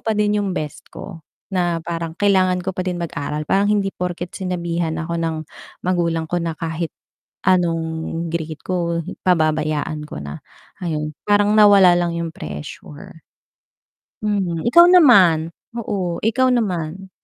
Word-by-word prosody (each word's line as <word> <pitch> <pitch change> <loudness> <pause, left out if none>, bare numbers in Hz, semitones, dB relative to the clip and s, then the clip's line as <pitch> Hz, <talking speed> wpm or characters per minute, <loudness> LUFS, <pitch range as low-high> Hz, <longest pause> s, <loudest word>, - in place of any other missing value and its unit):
pa 220 - +1
din 210 0 +2
yung 195 -2 -2
best 150 -2 -5
ko 165 -6 -9 0.2
na 175 -3 0
parang 165 0 -4
kailangan 185 -2 +3
ko 190 +1 -4
pa 185 - -2
din 180 -1 -3
mag-aral 150 -3 -3
parang 195 +1 +3
hindi 200 -2 +1
porket 180 -2 -5
sinabihan 170 -3 -2
ako 170 +1 -3
ng 165 -1 -1 0.4
magulang 170 -3 0
ko 175 - -1
na 170 -1 -1
kahit 165 +1 -4 0.5
anong 175 -3 +2 0.5
grade 160 -2 -4
ko 170 -2 -1 0.2
pababayaan 155 -2 +1
ko 75 - -7
na, 70 0 -7 0.4
ayun. 155 -2 -2 0.2
Parang 205 0 +4
nawala 200 -4 +7
lang 175 -1 0
yung 165 -1 -3
pressure. 75 0 -9 1.0
Mhm, 190 -6 -1
ikaw 340 +7 +8
naman? 200 - +6 0.2
Oo, 195 -7 -3
ikaw 250 +4 +2
naman. 190 -4 -2
175 Hz, 140 wpm, -20 LUFS, 160-195 Hz, 1.0 s, ikaw